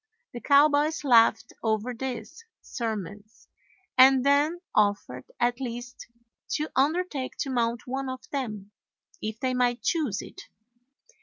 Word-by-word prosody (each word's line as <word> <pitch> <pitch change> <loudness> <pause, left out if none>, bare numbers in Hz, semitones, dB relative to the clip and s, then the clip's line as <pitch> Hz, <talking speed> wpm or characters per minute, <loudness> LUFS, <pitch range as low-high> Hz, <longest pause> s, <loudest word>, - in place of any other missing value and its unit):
The 240 - -7
cowboys 295 +2 +3
laughed 230 -4 +4
over 220 +2 -1
this 265 - -6 0.2
surmise 215 -2 -6 0.5
and 265 0 +7
then 290 +5 +3
offered 205 -12 0
at 240 +2 0
least 245 0 -7 0.5
to 305 +1 -2
undertake 290 0 0
to 270 - -2
mount 235 -2 -1
one 265 +1 -3
of 255 0 -7
them, 215 -8 -4 0.5
if 220 +1 -5
they 255 -1 -1
might 245 -1 0
choose 290 - 0
it. - - -11
250 Hz, 125 wpm, -27 LUFS, 225-280 Hz, 0.5 s, and